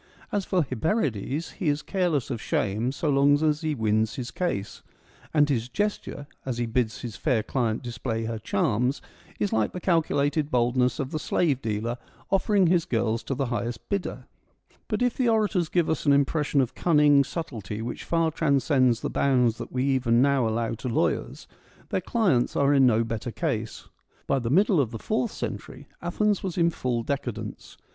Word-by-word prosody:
As 205 -2 -1
for 180 -3 +1
Hyperides, 140 - -1
he 175 -7 +1
is 145 +1 -1
careless 175 - 0
of 115 -3 -3
shame 110 +5 0
so 145 +3 -3
long 140 +1 +4
as 155 0 +2
he 155 -2 -1
wins 110 -1 +1
his 125 -2 -5
case; 105 - -3 0.5
and 150 -2 +4
his 125 -4 -1
gesture, 205 -2 -3 0.2
as 130 -3 -3
he 120 - 0
bids 115 -1 -1
his 120 -4 -6
fair 125 -8 0
client 115 -2 -1
display 115 -1 -3
her 115 0 -3
charms, 115 +5 0 0.4
is 205 - 0
like 110 -1 +1
the 180 - -4
calculated 155 -4 +1
boldness 125 -1 +2
of 135 -1 -3
the 155 - -2
slave 150 -3 +1
dealer 115 +2 -2 0.3
offering 195 0 +3
his 170 -1 +3
girls 115 0 0
to 115 +5 -3
the 135 +1 -1
highest 120 0 -4
bidder. 200 -2 -3 0.6
But 215 +1 0
if 245 -2 +1
the 250 -3 +2
orators 210 -7 +1
give 175 -3 +1
us 160 - -1
an 140 - +6
impression 140 0 +2
of 125 - -2
cunning 150 -4 +4
subtlety 110 - -5
which 120 - -5
far 165 -1 +1
transcends 135 -5 +2
the - - -2
bounds 125 -4 +2
that - - -7
we 130 0 -1
even 130 -4 +2
now 135 -2 +3
allow 115 +1 -1
to 120 +3 -5
lawyers, 85 -9 -1 0.4
their - - 0
clients 180 - +1
are. 140 0 +3
in 135 -2 +6
no 115 -1 +3
better 115 +1 -4
case. 110 -1 -3 0.4
By 135 - +1
the 115 -2 -3
middle 185 - +4
of 125 - -1
the 115 - -6
fourth 220 - -1
century - - -6
Athens 210 -2 0
was 185 -3 -4
in 170 -1 +3
full 120 -6 -2
decadence. 115 -5 -5
135 Hz, 185 wpm, -26 LUFS, 115-160 Hz, 0.6 s, an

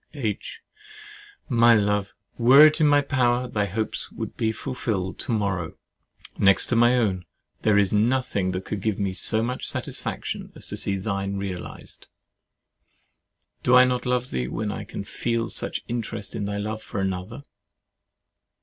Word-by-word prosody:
H. - - -4 0.9
My 120 -2 +5
love! 105 -1 +1 0.2
were 130 +5 +8
it 155 +1 +3
in 150 - +6
my 145 0 +5
power, 125 -3 +1
thy 105 -3 -1
hopes 110 +3 -3
should - - -5
be 110 -1 0
fulfilled 105 -7 -3
to - - -3
morrow. 95 -6 -1 0.6
Next 100 0 +5
to 120 - +1
my 120 +2 +5
own, 95 -7 0 0.4
there 105 -2 +3
is 100 -1 +3
nothing 110 -3 +1
that 95 +1 -4
could 105 - -4
give 110 -1 -1
me 100 -2 -1
so 110 +3 +1
much 125 +2 -2
satisfaction - - -5
as - - -6
to - - -4
see 100 - +1
thine 100 0 -2
realized! 95 -2 -7 1.5
Do 125 - +4
I 125 0 +8
not 125 -1 -1
love 125 0 0
thee, 60 0 -2
when 105 +7 -3
I - - -6
can - - -6
feel 115 +2 -2
such - - -3
an - - -37
interest 115 -4 -4
in 110 -3 -3
thy 100 0 -3
love 110 +1 -4
for 110 - -5
another? 95 +7 -3
110 Hz, 165 wpm, -24 LUFS, 100-120 Hz, 1.5 s, were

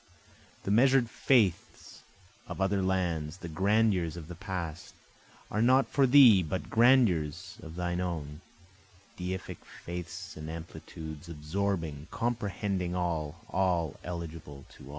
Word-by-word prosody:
The 100 - -2
measure'd 125 +2 +4
faiths 110 -10 +1 0.5
of - - -7
other 95 0 +1
lands, 90 -4 -1
the 90 - -8
grandeurs 95 -1 +1
of 80 -1 -9
the - - -6
past, 85 -2 -6 0.6
Are 105 - 0
not 130 +3 +4
for 140 -2 +3
thee, 125 -7 +8
but 90 +2 -4
grandeurs 100 - +3
of 80 0 -10
thine 90 0 -2
own, 80 -4 -4 0.7
Deific 95 +1 -5
faiths 85 -1 -8
and 80 0 -7
amplitudes, 80 -1 -8
absorbing, 80 -1 -3
comprehending 100 -6 -2
all, 85 -3 -3
All 90 -5 0
eligible 80 -5 -7
to - - -14
all. - - -12
90 Hz, 125 wpm, -30 LUFS, 80-100 Hz, 0.7 s, thee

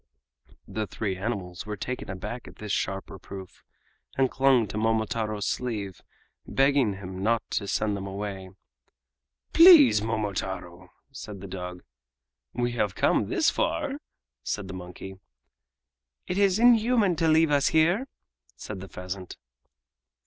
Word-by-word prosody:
The 110 -1 -3
three 100 -3 -3
animals 95 -3 -4
were 105 -1 -4
taken 125 +4 -5
aback 100 +6 -6
at - - -12
this 105 -1 -6
sharp 95 -1 -2
reproof, 95 0 -10 0.5
and 135 -1 +2
clung 130 -3 +4
to - - -7
Momotaro's 110 -1 0
sleeve, 105 -7 -3 0.5
begging 135 -5 +3
him 95 -1 -7
not 115 +3 +1
to 100 - -1
send 105 +1 0
them 100 0 -5
away. 95 -1 -5 1.0
"Please, 325 - +8
Momotaro!" 95 -5 -4 0.2
said 105 -2 -8
the 100 - -9
dog. 90 -1 -7 0.7
"We 120 0 -1
have 105 -5 -1
come - - +2
thus - - +2
far!" - - -1 0.4
said 105 -2 -3
the 95 - -7
monkey. 95 +1 -9 1.1
"It 180 +2 -2
is 195 -1 +4
inhuman 230 -4 +4
to 165 0 +2
leave 160 0 +4
us 140 -1 +3
here!" 175 +11 +3 0.5
said 105 -3 -7
the 95 0 -9
pheasant. 90 0 -7
105 Hz, 135 wpm, -27 LUFS, 95-135 Hz, 1.1 s, Please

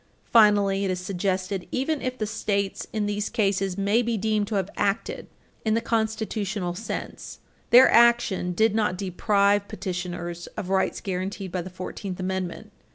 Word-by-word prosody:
Finally, 205 -3 +5
it 195 - 0
is 185 -1 -1
suggested, 185 0 -2
even 280 +3 -1
if 255 0 -3
the 215 - -1
States 200 -2 -2
in 215 -2 -1
these 205 0 -2
cases 195 -4 0
may 200 +4 +2
be 235 -1 -1
deemed 215 0 0
to 215 - -3
have 195 -1 -1
acted 205 +2 -1 0.4
in 220 0 +2
the - - +3
constitutional 220 -4 -2
sense, 205 +6 -6 0.3
their 250 +2 +9
action 235 -6 +4
did 220 +4 +2
not 210 -4 +1
deprive 200 +2 +2
petitioners 175 -2 -5
of 185 - -4
rights 190 0 +1
guaranteed 190 0 -4
by 180 - -2
the 180 - -7
Fourteenth 185 +1 -6
Amendment. 190 +2 -4
200 Hz, 160 wpm, -25 LUFS, 185-220 Hz, 0.4 s, their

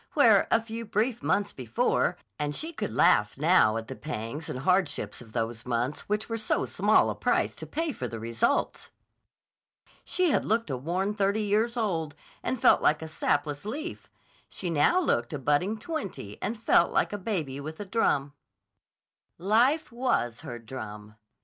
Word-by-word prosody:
Where, - - +6
a 225 - +4
few 225 0 -6
brief 225 +3 -1
months 205 0 0
before—and 140 +4 -1
she 325 +2 -4
could 215 -9 -3
laugh 120 -13 +3
now 145 -8 +4
at 115 0 -5
the 135 - -6
pangs 145 +1 -5
and - - -4
hardships 155 - 0
of 115 -3 -13
those 115 -1 -2
months 125 +7 -2
which 210 +1 -1
were 230 -1 -3
so 215 - 0
small - - +3
a - - -5
price - - 0
to - - -7
pay 325 0 -2
for 130 - -4
the 115 -1 -6
results!—she 115 - -3
had - - +2
looked 225 -5 0
a 130 - -1
worn 180 +9 -1
thirty 205 +1 +1
years 220 +4 +1
old 165 -9 -1 0.3
and 260 - -2
felt - - +5
like 155 +1 +2
a - - -5
sapless 145 -2 -1
leaf, 290 - -6 0.4
she 180 -3 -4
now 165 - +4
looked 120 - 0
a - - -1
budding 150 +10 +1
twenty 215 - -6
and 225 +1 -3
felt 175 -5 +4
like - - +1
a - - -1
baby 165 -10 -3
with 155 +3 -7
a 205 - -5
drum. 145 -9 +1 1.0
Life 245 - +2
was 230 - 0
her 120 - -7
drum. 110 -3 -8
170 Hz, 170 wpm, -28 LUFS, -, 1.0 s, Where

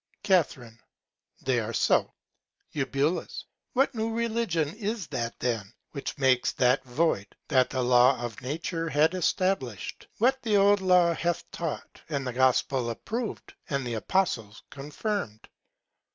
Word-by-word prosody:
Ca. 185 -4 +5 1.0
They 130 -2 +2
are 115 +1 -4
so. - - +2 0.6
Eu. 145 +3 0 0.5
What 270 +2 +2
new 225 -1 -2
Religion 225 -10 0
is 215 -2 -3
that 120 -4 -3
then, 115 -5 -2 0.2
which 140 - -5
makes 130 -3 +3
that 125 +1 +3
void, 125 -5 0 0.2
that 130 -4 +3
the 130 -1 -1
Law 125 +1 +5
of 120 -3 -5
Nature 165 +5 -3
had 155 +3 +3
establish'd? 180 - -1
What 260 +4 +2
the 215 -3 +2
old 200 0 +5
Law 180 -2 +4
hath 170 +1 -1
taught, 165 -3 -5
and 140 -3 -2
the 125 - -3
Gospel 130 -1 +2
approv'd, 225 - -5 0.2
and 140 -2 -1
the 120 - -3
Apostles 115 - -1
confirm'd? 145 - -4
150 Hz, 135 wpm, -27 LUFS, 125-190 Hz, 1.0 s, Ca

